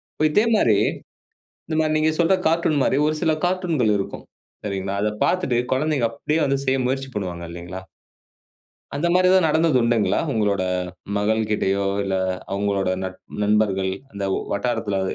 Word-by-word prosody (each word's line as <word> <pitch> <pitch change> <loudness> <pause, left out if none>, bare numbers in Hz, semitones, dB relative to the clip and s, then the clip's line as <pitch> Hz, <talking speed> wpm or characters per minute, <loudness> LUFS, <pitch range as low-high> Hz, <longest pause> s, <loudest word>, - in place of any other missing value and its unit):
இப்ப 155 - +1
இதே 210 +8 +3
மாரி 110 - +4 0.9
இந்த 155 - -2
மாரி 155 -1 +1
நீங்க 155 +1 +3
சொல்ற 170 +2 +3 0.2
கார்ட்டூன் 160 -3 +1
மாரி 130 - +2
ஒரு 155 - +1
சில 160 -2 +3
கார்ட்டூன்கள் 175 - +1
இருக்கும். 95 - -5 0.4
சரிங்களா? 100 -1 -3
அத 105 - +1 0.2
பார்த்துட்டு, 180 -9 +1 0.2
குழந்தைங்க 140 -2 +1
அப்படியே 150 +5 -1
வந்து 140 0 +1
செய்ய 130 0 +2
முயற்சி 135 +1 -2
பண்ணுவாங்க, 90 -4 -4
இல்லீங்களா? 85 +2 -7 1.1
அந்த 145 +4 0
மாரி 185 0 +4
ஏதாவது 185 -2 +5
நடந்தது 160 -2 +2
உண்டுங்களா? 115 -2 +2
உங்களோட 100 -4 +1 0.5
மகள்கிட்டயோ, 105 -2 0 0.2
இல்ல 95 -1 -1 0.4
அவுங்களோட 100 -1 0 0.2
நட் 95 0 -7 0.2
நண்பர்கள் 100 -2 +1 0.2
அந்த 100 -1 -4
ஓ - - 0
வட்டாரத்தில 105 -2 -1
115 Hz, 145 wpm, -22 LUFS, 100-155 Hz, 1.1 s, ஏதாவது